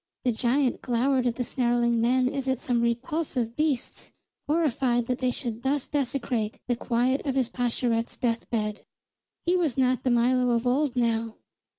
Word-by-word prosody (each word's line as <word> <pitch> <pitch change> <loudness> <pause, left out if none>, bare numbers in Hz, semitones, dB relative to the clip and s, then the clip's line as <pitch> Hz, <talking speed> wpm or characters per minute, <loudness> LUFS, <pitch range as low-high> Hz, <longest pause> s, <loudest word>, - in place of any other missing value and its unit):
The 250 - +3
giant 250 +3 +1
glowered 250 +1 +1
at 235 - 0
the 250 - -1
snarling 240 -2 +1
men 250 +2 +3
as 270 0 -2
at 260 -2 0
some 240 -2 0
repulsive 240 0 -1
beasts, 300 -5 -2 0.4
horrified 270 -6 +1
that 250 +1 -2
they 255 - +1
should 235 -3 -4
thus 270 +1 0
desecrate 250 -6 -2
the 245 - +1
quiet 245 +3 0
of 270 -2 -2
his 255 -3 +1
Pascherette's 235 -2 -1
death 230 -2 -1
bed. 215 -2 -2 0.6
He 350 +1 +3
was 325 -8 0
not 255 -1 +2
the 255 - 0
Milo 245 0 +3
of 235 +1 -1
old 260 +1 +1
now. 230 -2 0
250 Hz, 170 wpm, -26 LUFS, 235-265 Hz, 0.6 s, The